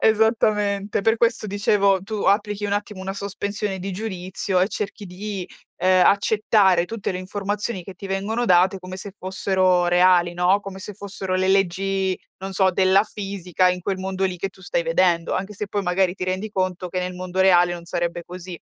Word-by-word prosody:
Esattamente. 210 -2 +2
Per 225 +2 +2
questo 230 -2 +1
dicevo, 200 -1 +2
tu 210 +1 -4
applichi 205 0 +1
un 200 - -1
attimo 205 -1 -3
una 190 +1 -4
sospensione 200 0 -4
di 195 +2 -4
giudizio 190 -1 -2
e 185 - +2
cerchi 210 -1 -5
di, 195 +1 -5 0.3
ehm, 185 0 +4
accettare 200 -3 +3
tutte 220 +2 -4
le 180 - -3
informazioni 205 +2 -3
che 190 +2 -10
ti 195 +2 -8
vengono 200 +5 -1
date 185 0 +4
come 185 0 -8
se 200 +2 -8
fossero 185 -1 +1
reali, 175 -1 +4
no, 180 +3 +3
come 195 -1 -8
se 205 +2 -8
fossero 195 -2 -5
le 185 0 +1
leggi, 195 0 +1 0.2
non 195 +1 -6
so, 190 0 +3
della 190 +1 +4
fisica 195 -4 -1
in 180 - -3
quel 190 +1 -2
mondo 190 0 -4
lì 185 -1 -1
che 195 +3 -3
tu 190 - -19
stai - - -1
vedendo, 175 - +2
anche 195 +3 -3
se 210 +1 -5
poi 200 0 -2
magari 180 0 +1
ti 190 - -8
rendi 185 +4 -2
conto 185 -2 -2
che 185 +1 -2
nel 180 0 -4
mondo 185 +1 -3
reale 175 -2 +5
non 170 -1 -7
sarebbe 170 0 -2
così. 180 0 -8
190 Hz, 190 wpm, -23 LUFS, 185-205 Hz, 0.3 s, reale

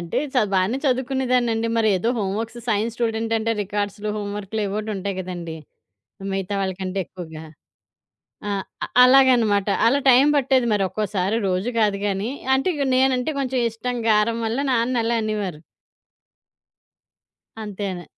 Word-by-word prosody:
అంటే 170 0 -2 0.2
చ 250 - +4
బానే 190 +6 +2
చదువుకునేదాన్నండి. 250 -3 +1
మరి 220 -1 +3
ఏదో 205 +6 -1
హోమ్‌వర్క్స్, 220 +4 -3
సైన్స్ 220 +2 0
స్టూడెంట్ 225 -1 -1
అంటే 225 +1 0
రికార్డ్స్‌లు, 205 +1 -3
హోమ్‌వర్క్‌లు 205 +1 -4
ఎవోటి 210 +2 -3
ఉంటాయి 195 0 -4
గదండి. 175 -3 -6 0.8
మిగతా 195 +1 -2
వాళ్ళ 190 -1 -1
కంటే 190 +1 -3
ఎక్కువగా. 160 -3 -9 1.0
ఆ! - - -1 0.5
అలాగనమాట. 245 -6 +5 0.2
అలా 275 +4 +3
టైం 255 +3 +6
బట్టేది 260 -2 +2
మరి 205 - +1
ఒక్కోసారి, 205 0 -1
రోజు 185 +6 -1
గాదు 205 -2 +2
గానీ, 200 +4 -2 0.3
అంటే 270 +7 0
ఇగా 280 -2 -1
నేనంటే 260 +2 +2
కొంచెం 260 -2 -1
ఇష్టం, 245 +2 -4
గారం 215 +2 +2
వల్ల 225 +3 -1
నాన్న 235 0 +1
అలా 230 0 +1
అనేవారు. 205 -7 -3 2.0
అంతేనే. 195 -4 -5
215 Hz, 130 wpm, -22 LUFS, 195-245 Hz, 2.0 s, టైం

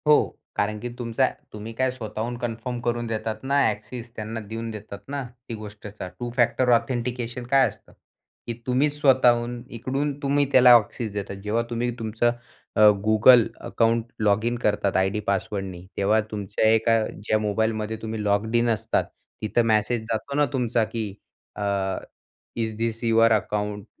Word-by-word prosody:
हो 150 - +8 0.4
कारण 105 +1 -1
की 120 +3 -5
तुमचा 120 +2 +1 0.3
तुम्ही 105 +1 -7
काय 130 +2 +1
स्वतःहून 115 -1 -5
कन्फर्म 120 +1 -4
करून 120 0 -1
देतात 110 0 -3
ना, 140 +1 +2
ॲक्सेस 110 +3 -5
त्यांना 110 +1 -5
देऊन 115 +2 -6
देतात 105 -2 -8
ना, 140 0 -3 0.3
ती - - -3
गोष्टच 105 -1 -10 0.2
टू-फॅक्टर 120 +1 +1
ऑथेंटिकेशन 120 0 -3
काय 135 +1 +5
असतं - - -12 0.6
की 120 - -2
तुम्हीच 145 +4 +1
स्वतःहून 120 -3 +3 0.2
इकडून 135 +4 -1
तुम्ही 145 0 +2
त्याला 125 -2 +8
ॲक्सेस 115 0 +1
देतात, 100 -1 -4
जेव्हा 110 +3 0
तुम्ही 120 +1 -1
तुमचं 115 +1 +1 0.4
अ, 110 - +3 0.2
Google 110 +2 +7 0.2
अकाउंट 115 0 +1 0.2
लॉगइन 110 +3 +2
करतात 105 -4 +1
आयडी 95 +3 +1
पासवर्डनी, 95 -2 -2
तेव्हा 105 +3 +3
तुमच्या 105 0 -1
एका 115 +1 +3
ज्या 110 +2 -1
मोबाईलमध्ये 110 +1 -1
तुम्ही 110 -1 -4
लॉग्ड 105 +3 +1
इन 120 0 +3
असतात 110 0 +1 0.4
तिथं 115 +2 +1
मॅसेज 110 +2 +2
जातो 115 +5 -3
ना 145 0 +4
तुमचा, 120 -3 +1
की 110 -2 -4 0.4
अ, - - -6 0.9
इझ 110 -2 -2
धिस 115 0 -2
युअर 115 0 +4
अकाऊंट 105 -1 -1
115 Hz, 150 wpm, -25 LUFS, 105-120 Hz, 0.9 s, हो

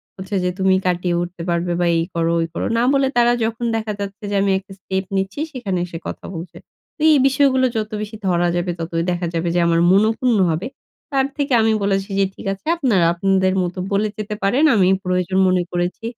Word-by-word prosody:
হচ্ছে 190 +2 -6
যে 180 - +1
তুমি 190 0 +3
কাটিয়ে 180 -1 0
উঠতে 175 0 -6
পারবে, 170 +1 0
বা 175 - +2
এই 165 - +1
করো, 165 0 +1
ঐ - - +1
করো। - - -3
না 235 - +2
বলে 275 -1 +3
তারা 240 0 +5
যখন 225 +1 -2
দেখা 220 -1 -2
যাচ্ছে 200 +2 -6
যে, - - 0
আমি 195 0 +2
একটা 195 +1 -18
স্টেপ 190 0 -3
নিচ্ছি 195 +5 -3
সেখানে 205 - -3
এসে 170 -2 -7
কথা - - -7
বলছে। 170 +1 -8 0.4
তো - - -12
এই 295 - +5
বিষয়গুলো 265 -1 +3
যত 215 0 -2
বেশি 215 +1 -6
ধরা 175 -1 +2
যাবে, 175 +1 -1
ততই 165 0 -2
দেখা 175 0 -2
যাবে 165 +1 -1
যে - - +3
আমার 165 0 +3
মনঃক্ষুণ্ণ 220 +4 +3
হবে। 165 +9 -2 0.4
তার 270 -1 +2
থেকে 285 -2 -1
আমি 220 0 +3
বলেছি, 195 0 0
যে, 195 - +4
"ঠিক - - -11
আছে, 195 - -14
আপনারা 220 - +2
আপনাদের 190 +1 +1
মত 175 0 -4 0.2
বলে 200 +2 +1
যেতে 210 0 -4
পারেন। 245 +10 +2
আমি 190 -4 +4 0.2
প্রয়োজন 180 0 0
মনে 185 -1 +2
করেছি। 175 +5 -2
195 Hz, 210 wpm, -20 LUFS, 175-220 Hz, 0.4 s, তারা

